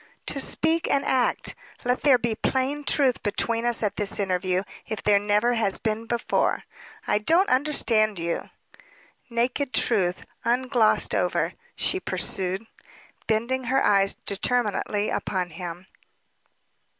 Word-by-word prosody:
"To 275 - -1
speak 320 +4 0
and 280 - +1
act. 255 -2 +1 0.3
Let 250 +1 +1
there 275 -4 +6
be 235 -1 -1
plain 265 +5 -1
truth 270 -4 +2
between 230 +3 -1
us 235 -1 0
at 210 - -1
this 205 -2 0
interview, 185 -1 0 0.2
if 215 - -4
there 205 -1 +4
never 210 +4 +2
has 220 -4 0
been 220 +1 -2
before." 235 0 0 0.4
"I - - +2
don't 330 - +3
understand 235 -6 +2
you." 170 0 -3 0.8
"Naked 250 +3 -1
truth, 185 -6 +1 0.2
unglossed 245 -2 +2
over," - - 0 0.2
she 375 - 0
pursued, 190 - -1 0.6
bending 235 +4 0
her 265 +3 +2
eyes 195 -1 +4
determinately 210 -1 0
upon 180 -2 -2
him. 175 0 -7
225 Hz, 125 wpm, -25 LUFS, 200-255 Hz, 0.8 s, there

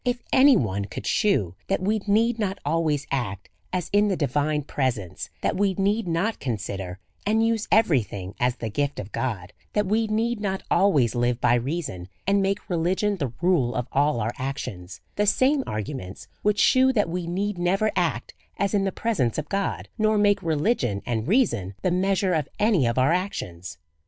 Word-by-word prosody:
If 245 -1 -1
any 265 -1 +7
one 100 - -1
could 100 - -7
shew 105 - +1
that 195 - +1
we 210 +4 0
need 225 +3 +2
not 200 -2 -1
always 155 -3 0
act 105 -8 -3 0.2
as 180 -2 -2
in 205 +1 +4
the 195 -3 0
divine 150 +1 0
presence, 125 - -3
that - - 0
we 195 -1 +1
need 200 +2 0
not 175 +7 0
consider 100 -7 -4 0.3
and 220 +2 +2
use 225 -2 0
every 175 - +4
thing 95 -2 -7
as 125 0 +1
the 115 -3 -5
gift 145 +4 -1
of 100 +1 -7
God, 105 -9 -3 0.2
that 210 0 +1
we 220 +3 +1
need 225 +2 0
not 195 -2 -2
always 145 - +3
live 120 0 0
by 120 - +3
reason, 120 - -2 0.2
and 200 +1 +3
make 195 +1 -1
religion 185 +4 0
the 140 -8 -2
rule 155 -10 +2
of 125 -1 -2
all 145 -2 +2
our 115 +2 -1
actions, 105 -9 -5 0.2
the 210 0 +2
same 265 +7 +3
arguments 105 -2 -5
would 210 0 +2
shew 260 +5 +5
that 210 -6 +2
we 175 0 -3
need 190 +2 -2
never 195 +5 +1
act - - -1 0.2
as 200 +1 0
in 200 -1 +2
the 195 - 0
presence 185 - -1
of 150 -1 -4
God, 195 0 -2
nor 215 0 +3
make 205 -1 +3
religion 150 - 0
and 115 -1 -2
reason 120 - +1
the 185 - +2
measure 190 +1 +1
of 155 -4 -1
any 205 - +3
of 115 - -1
our 130 +5 +4
actions. 95 - -4
175 Hz, 185 wpm, -25 LUFS, -, 0.3 s, any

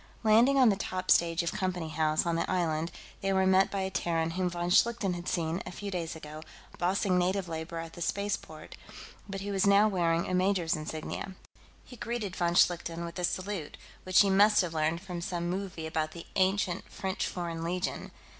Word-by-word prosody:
Landing 230 +6 +5
on 255 -3 +6
the 200 - +3
top 185 -1 -2
stage 170 0 +4
of 170 - -1
Company 180 -4 -2
House, 155 0 +1
on 170 -1 0
the 170 - -1
island, 165 -2 0 0.3
they 195 - 0
were 190 0 +3
met 190 0 +4
by 195 - -2
a 190 0 -2
Terran 165 -3 0
whom 180 +1 -1
von 175 0 -3
Schlichten 225 -1 +3
had 175 0 -6
seen, 165 +1 -1
a - - -7
few 200 +2 -6
days 170 -3 -3
ago, 155 -1 -9 0.4
bossing 185 +1 +2
native 185 +1 0
labor 160 +1 -5
at 165 0 -6
the 175 - -10
spaceport, 200 -4 -3 0.5
but 195 0 -5
who 200 +1 -4
was 195 0 +2
now 200 +2 +6
wearing 170 -4 +1
a - - -3
major's 180 -2 +2
insignia. 155 +4 -5 0.5
He 250 - -12
greeted 225 -5 -4
von 170 -1 0
Schlichten 170 -1 +2
with 170 +2 -7
a - - -3
salute 185 -3 -3 0.3
which 185 -1 +5
he 200 -1 +3
must 205 +2 +5
have 175 -3 -3
learned 160 +2 0
from 180 -2 -6
some 175 0 -2
movie 185 -4 -4
about 155 -1 -2
the 170 - -9
ancient 190 -1 0
French 190 -1 -2
Foreign 170 -2 -4
Legion. 180 +2 -3
180 Hz, 200 wpm, -30 LUFS, 165-195 Hz, 0.5 s, on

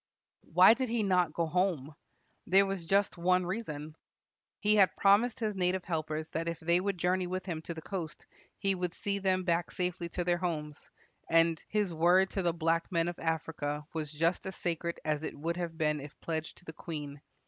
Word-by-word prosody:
Why 180 +6 +8
did 255 0 -2
he 230 -1 0
not 180 -4 +2
go 170 +2 0
home? 165 -4 0 0.5
There 195 +2 +6
was 195 -4 -4
just 195 -1 +2
one 180 +1 +3
reason. 155 -6 -5 0.6
He 210 0 +3
had 195 -2 +5
promised 215 +5 +4
his 215 -2 -1
native 185 0 0
helpers 155 -2 -2
that 165 +1 -3
if 170 -1 -3
they 170 +2 +2
would 195 0 -1
journey 180 +1 +1
with 185 +1 -4
him 165 -4 -4
to 170 - -5
the 160 - -8
coast, 175 -6 -5 0.3
he 195 -1 +1
would 180 -2 -3
see 200 0 -2
them 185 -1 +1
back 170 -1 0
safely 180 -1 -3
to 175 - -2
their 175 0 +2
homes, 155 -4 -4 0.4
and 165 -1 +3
"his 205 -4 0
word 175 +4 +4
to 195 - -1
the 175 -2 +2
black 165 +2 0
men 170 -1 +1
of 175 - -7
Africa 155 -2 -2
was 155 -3 -3
just 165 +5 0
as 190 - -5
sacred 170 -1 -3
as 150 -1 0
it 160 - -5
would 165 +4 -2
have 170 -2 -4
been 150 -2 +1
if 140 0 -11
pledged 160 -1 -4
to - - -15
the 160 - -7
queen. 150 -4 -7
175 Hz, 205 wpm, -31 LUFS, 160-185 Hz, 0.6 s, Why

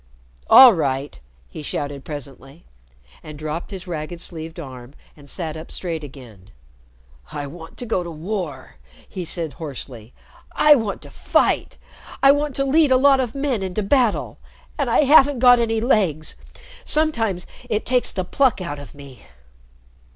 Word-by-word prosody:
"All 260 -3 +10
right!" 140 -4 -2 0.3
he 155 - -9
shouted 145 -1 -4
presently, 140 +1 -9 0.6
and 155 -1 -10
dropped 155 +2 -5
his 190 -3 -8
ragged 170 -1 -6
sleeved 165 -1 -8
arm 130 -3 -10 0.2
and 145 -2 -16
sat 160 -4 -5
up 160 +1 -9
straight 165 -4 -4
again. 120 -9 -13 0.8
"I 145 - -5
want 165 +3 -11
to 245 - -6
go 220 -5 -1
to 175 - -6
war!" 165 -4 -6 0.3
he 185 -3 -6
said 165 -2 -2
hoarsely. 130 -7 -8 0.4
"I 300 - +6
want 225 -8 -2
to - - -13
fight! - - 0 0.5
I 275 - +8
want 290 -1 -1
to 275 - 0
lead 300 +2 +3
a 260 - +5
lot 270 0 +5
of 250 -2 -2
men 275 -6 -1
into 190 +2 -3
battle! 240 +1 +1 0.4
And - - -1
I - - +4
haven't 285 -1 +5
got 245 0 +6
any 225 -1 0
legs. 190 - 0 0.5
Sometimes 225 - +1 0.2
it 215 -1 -1
takes 250 0 +1
the 185 -2 -3
pluck 260 +4 +1
out 170 -6 -5
of 145 - -12
me." 140 -5 -13
175 Hz, 160 wpm, -21 LUFS, 145-240 Hz, 0.8 s, All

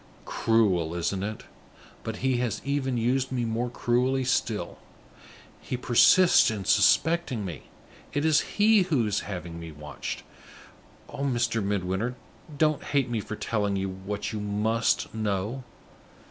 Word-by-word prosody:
Cruel, 95 -8 +1
isn't 95 +2 -1
it? 105 +2 -4 0.6
But 110 -1 -4
he 130 -2 +2
has 120 -3 -1
even 135 -3 -1
used 125 +3 0
me 125 -2 -1
more 115 +2 -1
cruelly 125 +2 +1
still; 120 -4 -1 0.8
he 125 - -4
persists 150 +9 +5
in 105 -3 -4
suspecting 160 - +3
me; 85 -6 -8 0.4
it 145 +2 -1
is 155 -2 +4 0.2
he 210 0 +5
who 155 -11 +1
is 105 -1 0
having 85 -3 -6
me 85 -1 -8
watched. 75 0 -7 0.8
Oh, 145 - -8
Mr. 120 -4 0
Midwinter, 100 +4 -1 0.4
don't 155 -1 +2
hate 135 -4 0
me 115 - 0
for 110 +1 -5
telling 105 -2 -1
you 95 0 -1
what 95 +4 -5
you 105 - -3
must 105 +3 0
know! 110 +3 -2
115 Hz, 140 wpm, -27 LUFS, 100-130 Hz, 0.8 s, persists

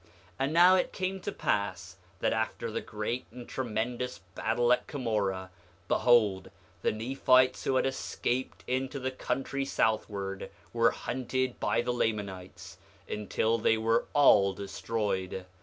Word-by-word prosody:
8:2 - - -28 0.3
And 135 +3 0
now 175 +2 +7
it 185 - 0
came 190 +1 -2
to 205 - -4
pass 95 - -2 0.2
that - - +2
after 110 +1 -2
the - - -2
great 110 +4 -4
and 120 0 -10
tremendous 125 0 -3 0.2
battle 120 +4 +2
at - - -1
Cumorah, 100 - -2 0.4
behold, 110 -6 +3 0.3
the - - +2
Nephites 130 +3 +2
who 135 - +1
had 130 - +3
escaped 130 -1 -2
into 130 +2 -2
the 130 -1 -2
country 135 +1 -2
southward 100 -6 -1 0.2
were - - +4
hunted 130 0 -2
by - - +1
the 125 0 -1
Lamanites, 95 -5 -3 0.3
until 110 +2 0
they 110 0 +3
were 115 +1 +2
all 100 -9 +6
destroyed. 95 -1 -3
115 Hz, 140 wpm, -30 LUFS, 100-130 Hz, 0.4 s, now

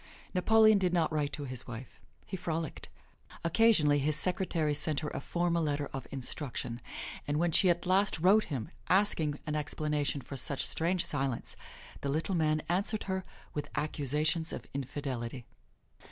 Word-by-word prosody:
Napoleon 215 +2 +5
did 180 -2 +1
not 165 -2 +2
write 150 -2 0
to 145 - -3
his 130 -1 -6
wife. 120 +1 -8 0.3
He - - -5
frolicked. 165 -3 -4 0.5
Occasionally 170 -6 +4
his 150 +2 +1
secretary 170 -2 +1
sent 150 0 +1
her 150 - -3
a 135 - -3
formal 170 +2 0
letter 145 -2 0
of 135 -2 -5
instruction, 125 -2 -4 0.5
and 145 0 0
when 170 +1 +2
she 185 +4 +4
at 175 0 +1
last 195 +3 +3
wrote 195 +6 +5
him 140 +1 -4 0.2
asking 180 -7 +3
an 155 -1 -2
explanation 150 -1 -1
for 135 - -8
such 135 +1 +1
strange 170 +2 0
silence, 135 -4 -2 0.5
the 140 - -2
Little 160 +6 -1
Man 155 -2 +1
answered 200 +5 0
her 190 -1 -2 0.3
with 145 -1 -4
accusations 150 +2 +1
of - - -6
infidelity. 130 -3 -4
155 Hz, 155 wpm, -31 LUFS, 145-175 Hz, 0.5 s, Napoleon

